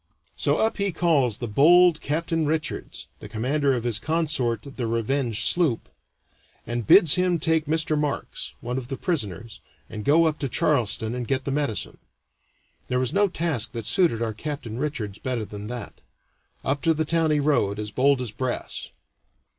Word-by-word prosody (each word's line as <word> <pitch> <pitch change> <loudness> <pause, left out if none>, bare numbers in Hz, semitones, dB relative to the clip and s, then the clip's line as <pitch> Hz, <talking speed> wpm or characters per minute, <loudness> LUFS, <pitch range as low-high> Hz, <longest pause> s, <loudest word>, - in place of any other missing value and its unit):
So - - +1
up 220 - +1
he 200 -1 0
calls 150 -10 +2
the 120 - -4
bold 165 +8 +5
Captain 160 +1 -1
Richards, 155 0 -3
the - - -9
commander 135 +5 0
of 120 - -3
his 115 -3 0
consort 150 -9 0
the 135 -4 -5
Revenge 115 0 0
sloop, 165 -10 +2 0.8
and 120 -3 -3
bids 170 -7 +7
him 180 -1 +2
take 160 -1 +1
Mr. 160 0 +1
Marks 150 -1 -3
(one 125 +2 -3
of 125 -1 -9
his 135 - -4
prisoners), 115 - -3 0.3
and 105 -1 -6
go 160 +6 +4
up 155 -1 0
to 140 - -2
Charleston 115 -3 +1
and 125 -2 -4
get 130 -1 -1
the 140 - -2
medicine. 140 -6 -2 0.9
There 125 - 0
was 130 -1 0
no 200 +1 +4
task 160 - -2
that 115 -3 -5
suited 165 - +2
our 110 -1 -2
Captain 125 -2 -5
Richards 115 -9 -3
better 125 -4 -3
than 105 0 -8
that. 120 -2 -7 0.6
Up 140 +1 0
to 165 -1 +2
the 160 +1 0
town 165 0 +2
he 150 -1 +2
rowed, 140 -9 +1
as 105 0 -5
bold 135 +2 +2
as 120 -4 -3
brass. 125 +2 -4
135 Hz, 175 wpm, -25 LUFS, 115-160 Hz, 0.9 s, bids